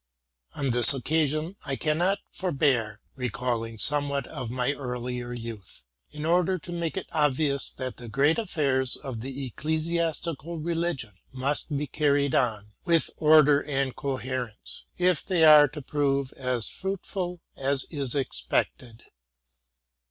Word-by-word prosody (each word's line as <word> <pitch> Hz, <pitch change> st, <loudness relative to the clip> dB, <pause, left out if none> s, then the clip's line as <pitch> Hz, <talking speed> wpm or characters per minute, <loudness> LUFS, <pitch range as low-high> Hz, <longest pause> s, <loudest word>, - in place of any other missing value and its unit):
On 140 Hz, -3 st, -1 dB
this 120 Hz, +3 st, +11 dB
occasion 155 Hz, +5 st, -1 dB
I 140 Hz, -2 st, -2 dB
cannot 170 Hz, -, +1 dB
forbear 135 Hz, -, 0 dB
recalling 120 Hz, -3 st, -3 dB
somewhat 140 Hz, +3 st, +1 dB
of 120 Hz, -, -7 dB
my 125 Hz, +3 st, -1 dB
earlier 125 Hz, -2 st, -5 dB
youth, 115 Hz, -, -8 dB, 0.3 s
in 150 Hz, 0 st, -7 dB
order 180 Hz, +2 st, +2 dB
to 175 Hz, +1 st, -10 dB
make 170 Hz, 0 st, -3 dB
it 190 Hz, -, -3 dB
obvious 145 Hz, -2 st, +1 dB
that 130 Hz, -1 st, -6 dB
the 120 Hz, -2 st, -9 dB
great 140 Hz, -, +2 dB
affairs 140 Hz, -, 0 dB
of 125 Hz, -5 st, -7 dB
the 135 Hz, +2 st, -5 dB
ecclesiastical 160 Hz, +3 st, -2 dB
religion 165 Hz, -8 st, -3 dB, 0.2 s
must 140 Hz, +3 st, -2 dB
be 150 Hz, -, -2 dB
carried 140 Hz, -1 st, +1 dB
on 105 Hz, -4 st, -1 dB
with 170 Hz, -3 st, +2 dB
order 150 Hz, -2 st, +5 dB
and 135 Hz, -2 st, -2 dB
coherence, 130 Hz, -4 st, -5 dB
if 180 Hz, -3 st, +1 dB
they 180 Hz, -4 st, +1 dB
are 150 Hz, -1 st, +8 dB
to 145 Hz, +1 st, -9 dB
prove 140 Hz, -1 st, -1 dB
as 125 Hz, -4 st, -2 dB
fruitful 190 Hz, -2 st, -4 dB, 0.2 s
as 135 Hz, 0 st, 0 dB
is 140 Hz, -4 st, -2 dB
expected. 115 Hz, -, -2 dB
140 Hz, 130 wpm, -26 LUFS, 125-160 Hz, 0.3 s, this